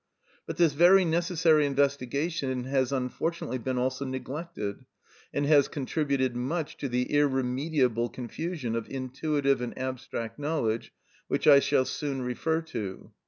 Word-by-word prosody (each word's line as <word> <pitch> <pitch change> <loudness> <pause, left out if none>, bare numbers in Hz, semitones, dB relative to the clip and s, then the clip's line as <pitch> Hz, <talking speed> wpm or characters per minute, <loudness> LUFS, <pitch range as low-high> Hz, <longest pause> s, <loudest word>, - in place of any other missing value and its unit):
But 165 - -5
this 170 -4 +4
very 180 +5 +6
necessary 165 -2 +3
investigation 140 0 0
has 130 0 0
unfortunately 135 +2 -2
been 130 +2 -2
also 130 +2 -1
neglected, 130 - -5 0.5
and 145 - 0
has 145 -2 +5
contributed 140 -3 -1
much 145 +6 -2
to 140 - -3
the 125 +1 +1
irremediable 130 -3 +1
confusion 130 0 -4
of 115 -1 -4
intuitive 135 +1 0
and 120 - -5
abstract 130 -2 -5
knowledge 145 -7 -1 0.4
which - - -1
I 140 -2 +9
shall 140 -2 +2
soon 140 -3 -3
refer 160 +6 -1
to. 100 -4 -5
135 Hz, 130 wpm, -28 LUFS, 125-155 Hz, 0.5 s, I